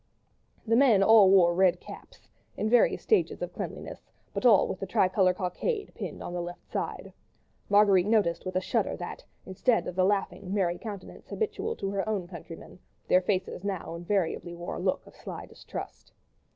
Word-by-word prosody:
The 225 0 +2
men 235 -6 +5
all 215 -2 +7
wore 180 -3 +5
red 180 0 +3
caps—in 220 - -8
various 245 - +3
stages 435 - +1
of - - -5
cleanliness—but 255 - -5
all 210 -5 +6
with 190 - -5
the 195 - -5
tricolour 185 0 +2
cockade 405 - -3
pinned - - -7
on - - -6
the 175 - -2
left 175 0 -7
hand - - -37
side. - - -4 0.6
Marguerite 200 -2 +5
noticed 210 -6 +2
with 185 - -5
a 185 - +2
shudder - - -1
that, - - -7 0.2
instead 205 +5 +1
of 180 - -5
the 185 - +2
laughing, 195 -1 -1
merry 175 -3 0
countenance 205 -4 -9
habitual 445 +1 -2
to 195 - -4
her 200 +2 -2
own 195 -5 -2
countrymen, 170 0 -11 0.3
their 185 - +5
faces 185 -1 -2
now 190 -4 -4
invariably 175 -1 -2
wore 175 +1 -6
a - - -5
look 185 +1 -1
of - - -17
sly - - -8
distrust. - - -9
190 Hz, 175 wpm, -28 LUFS, 180-210 Hz, 0.6 s, all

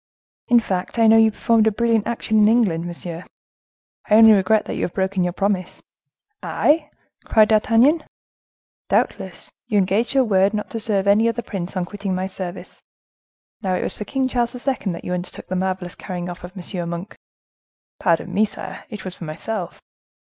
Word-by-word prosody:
"In 240 0 +6
fact, 190 -1 -3
I 230 - +4
know 225 0 +7
you 225 0 +6
performed 220 0 +2
a - - +4
brilliant 230 0 +1
action 220 -2 0
in 210 - +6
England, 200 -8 +2
monsieur. 170 0 -6 0.9
I 210 - +5
only 225 0 +9
regret 210 +1 +3
that - - -4
you - - -4
have 175 - -3
broken 190 -1 0
your 175 - 0
promise." 190 -1 -2 0.6
"I!" 300 0 +1 0.4
cried 215 -1 +4
D'Artagnan. 230 +8 +4 0.9
"Doubtless. - - -1 0.2
You 215 -4 +1
engaged 200 +7 +1
your 265 - +5
word 200 -2 +2
not 210 - -4
to 225 - -3
serve 205 -3 0
any 210 +3 +4
other 235 +1 -3
prince 190 -2 -5
on 180 - -1
quitting 200 0 -4
my 185 +1 -2
service. 185 -1 -6 0.8
Now 190 -3 0
it - - -2
was - - -2
for 210 - -6
King 265 +2 -1
Charles 240 -1 0
II. 250 -5 -2
that 170 - -8
you 180 - -2
undertook 180 0 -5
the 185 - -2
marvelous 185 -1 -2
carrying 180 -2 -6
off 175 0 -8
of 180 +3 -10
M. 175 -1 -5
Monk." 170 +4 -6 0.8
"Pardon 175 +1 +1
me, 205 +3 +3
sire; 215 - -6
it 210 -4 -8
was 185 - -5
for 175 - -9
myself." 175 +4 -5
200 Hz, 185 wpm, -21 LUFS, 185-225 Hz, 0.9 s, only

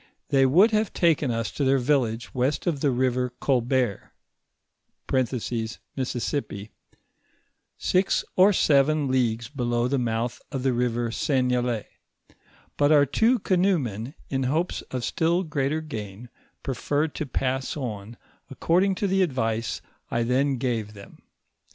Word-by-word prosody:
They 135 -1 +4
woiild 185 - +5
have 215 -1 0
taken 160 -5 +2
us 115 -1 -2
to 145 - -2
their 135 0 +3
village 120 -4 0
west 130 +3 0
of 165 -5 0
the 140 - +2
river 125 0 +1
Colbert 125 -4 0 1.8
(Mississippi), 125 -5 -3 1.1
six 185 +1 +1
or 190 +3 +6
seven 150 -4 +3
leagues 120 -3 0
below 120 -3 -1
the 135 +1 0
mouth 115 0 -2
of 130 -2 -3
the 135 -2 +2
river 120 -1 0
Seigne 125 -1 +1
lay; 120 -4 -2 0.9
but 145 +1 +3
our 145 -2 +6
two 225 - +3
canoemen, 160 - 0
in 135 -1 -2
hopes 165 +6 -1
of 125 -2 -4
still 170 +1 +1
greater 155 -1 -1
gain, 110 -6 -7 0.3
preferred 145 +3 -1
to 155 - -4
pass 130 +2 -2
on, 115 -4 -6 0.3
according 180 +7 +1
to 200 - -2
the 195 0 +2
advice 115 -8 -1 0.3
I 115 - 0
then 130 +3 +1
gave 115 -4 -2
them. 100 -1 -14
130 Hz, 130 wpm, -25 LUFS, 120-150 Hz, 1.8 s, or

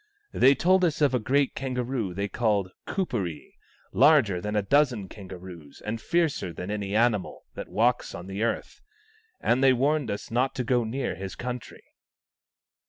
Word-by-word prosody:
They 135 +2 +5
told 185 +4 +3
us 165 -4 +1
of 145 -4 +3
a 125 - +2
great 135 +4 +1
kangaroo 125 -7 -3
they 100 +1 -1
call 105 -4 0 0.2
Kuperee, 105 - -3 0.4
larger 130 - +4
than 105 +3 -3
a 105 - +2
dozen 125 -4 +2
kangaroos 90 -6 -11
and 115 +1 -3
fiercer 165 - 0
than 90 +4 -6
any 100 -1 -3
animal 110 -4 +1
that - - -7
walks 120 +3 +1
on 85 - -7
the 95 +2 -5
earth; 115 - -2 0.6
and 125 +3 +2
they 135 -1 +6
warned 140 +1 +1
us 100 - -5
not 125 +4 +1
to 130 - -1
go 120 0 +2
near 125 +5 -2
his 95 -1 -7
country." 125 +2 -6
120 Hz, 165 wpm, -26 LUFS, 100-135 Hz, 0.6 s, they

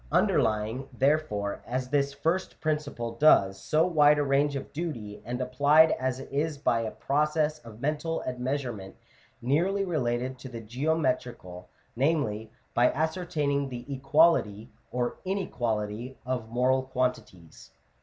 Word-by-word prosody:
Underlying, 110 +5 +1
therefore, 135 -8 0
as 125 +1 -2
this 140 0 +1
first 165 +6 -2
principle 150 -7 -2
does, 105 -7 +4
so 160 +1 +3
wide 150 -4 +5
a 145 - +2
range 140 +1 +2
of 135 - -6
duty, 120 -11 -5
and 125 +1 -4
applied 145 +5 +5
as 130 0 -1
it 135 - -8
is 145 +2 -1
by 120 -5 +1
a 110 - -2
process 150 +4 0
of 115 0 -13
mental 155 +3 -1
admeasurement 125 -6 -3 0.5
nearly 180 +10 +1
related 130 -6 -1
to 130 - -8
the 120 -2 -7
geometrical 125 - -2
— - - -38
namely, 115 -6 0 0.2
by 120 +1 +4
ascertaining 150 -3 -1
the 120 -1 -7
equality 135 -6 +2 0.2
or 125 -1 -2
inequality 120 - -3
of 125 -3 -3
moral 130 +3 +2
quantities 115 - -4
(p. - - -38
130 Hz, 135 wpm, -28 LUFS, 115-150 Hz, 0.5 s, wide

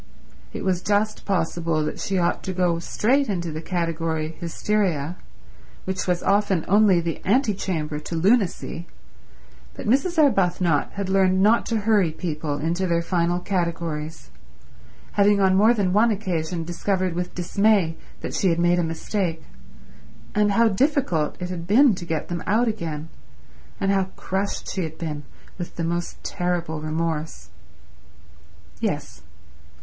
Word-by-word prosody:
It - - -6
was 185 -2 +1
just 210 +2 0
possible 165 -4 0
that 155 - -4
she 195 - -1
ought 175 -1 +1
to 190 - -2
go 175 -2 +1
straight 255 +10 +1
into 175 -4 -2
the 155 +1 -5
category 165 -2 -2
Hysteria, 175 -3 -1 0.7
which 190 0 -2
was 180 -1 0
often 200 -4 +2
only 200 -2 +5
the 165 -1 -3
antechamber 190 - 0
to 160 +3 -6
Lunacy, 180 -2 +1 0.9
but - - -7
Mrs. 280 +9 +2
Arbuthnot 180 - +2
had 200 -1 -3
learned 190 -1 +3
not 225 +3 +4
to 225 -2 0
hurry 205 -5 +3
people 155 -3 -3
into 170 +5 -1
their 170 -1 +1
final 175 0 +1
categories, 165 -5 -3 0.8
having 205 0 +4
on 190 -1 +4
more 215 +4 +6
than 200 -6 +1
one 220 +4 +5
occasion 175 -5 -2
discovered 185 +2 -1
with 180 +1 -4
dismay 190 -1 +2 0.3
that - - -5
she 190 - +2
had 165 - +1
made 175 +1 +3
a - - +2
mistake; 165 0 -2 0.9
and 205 -1 +2
how 230 +3 +5
difficult 220 - +1
it 180 0 -4
had 170 -2 -5
been 245 +5 +6
to 175 -2 -6
get 160 -3 -2
them 175 -1 -4
out 225 +5 +3
again, 165 -8 -3 0.7
and 195 - +1
how 195 -1 +2
crushed 195 +2 -3
she 190 - -2
had 160 -2 -5
been 150 -3 -4 0.4
with 175 - -6
the 170 - -3
most 170 +1 -2
terrible 170 -3 -2
remorse. 160 0 -3 1.3
Yes. - - -3
180 Hz, 145 wpm, -24 LUFS, 165-200 Hz, 1.3 s, more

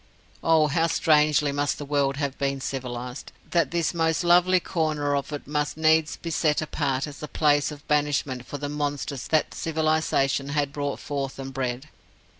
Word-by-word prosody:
Oh, 160 -2 +4
how 165 +3 +2
strangely 150 -3 +3
must 145 +1 0
the 145 - -6
world 140 -1 0
have 140 -2 -2
been 140 0 -1
civilized, 125 -1 -5 0.2
that 170 -1 +2
this 170 0 0
most 165 +1 +1
lovely 180 +1 +5
corner 155 -5 -1
of 140 +1 -3
it 145 - -5
must 150 +1 -2
needs 160 0 +3
be 165 - -6
set 150 -1 +2
apart 140 -3 -1
as 145 -2 -10
a 150 - -5
place 145 -1 +2
of 145 -1 -11
banishment 145 -4 0
for 145 - -5
the 145 +1 -4
monsters 145 -2 -3
that 155 -1 +1
civilization 155 -4 0
had 145 -1 -1
brought 145 -1 -3
forth 140 -2 -4
and 135 0 -7
bred! 130 +1 -3
145 Hz, 175 wpm, -25 LUFS, 140-155 Hz, 0.2 s, lovely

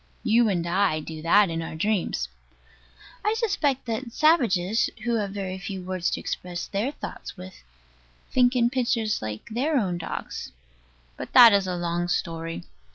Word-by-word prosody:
You 230 0 +4
and 175 -4 0
I 180 -2 +1
do 155 0 -7
that 185 +3 +4
in 165 0 -2
our 165 - -6
dreams. 175 - -1 1.0
I 425 +1 +1
suspect 320 - 0
that 235 +1 -4
savages, 225 - +3
who 235 0 +1
have 205 -2 -1
very 190 -1 -5
few 190 -1 -6
words 185 -1 -1
to - - -2
express 175 -1 -4
their 210 +7 -2
thoughts 290 - -8
with, 185 0 -11 0.7
think 250 0 +3
in 240 -1 +3
pictures, 235 -4 0
like 110 0 -6
their 275 +7 0
own 185 -7 0
dogs. 160 - -6 0.7
But - - -8
that 235 -4 +10
is 200 -1 +2
a 180 - -2
long 175 0 -1
story. 165 -1 -3
195 Hz, 160 wpm, -25 LUFS, 175-235 Hz, 1.0 s, that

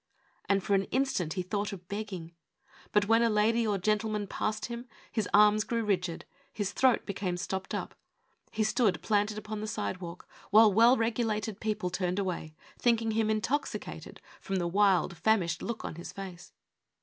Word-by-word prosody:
And 195 -1 +3
for 200 - 0
an 195 0 +3
instant 255 - 0
he 185 - -2
thought 205 +2 -2
of 180 -3 -9
begging. 195 -5 -5 0.6
But 210 -1 +3
when 225 +1 +5
a 235 - +4
lady 220 +2 +2
or 205 -2 +1
gentleman 210 +2 0
passed 215 +2 -2
him 235 +1 -6 0.2
his 220 - -1
arms 210 +1 +6
grew 230 +2 -1
rigid, 185 -4 -1 0.3
his 205 -2 -2
throat 255 +2 +3
became 190 -3 -2
stopped 190 +1 -3
up. - - -4 0.6
He 220 - -1
stood, 215 -3 +1
planted 210 0 +1
upon 215 0 -5
the 215 - -4
sidewalk, 175 - -5 0.2
while 215 0 +7
well 235 +5 +6
regulated 225 -2 -1
people 210 -4 -2
turned 180 0 -1
away, 175 -5 -3 0.2
thinking 230 -2 +2
him 220 0 +1
intoxicated 230 +7 -3 0.2
from 195 - -4
the 180 -2 0
wild, 185 -2 +2
famished 180 -6 +1
look 235 -1 -4
of 160 - -5
his 170 - -7
face. 185 -3 -9
210 Hz, 170 wpm, -30 LUFS, 185-220 Hz, 0.6 s, while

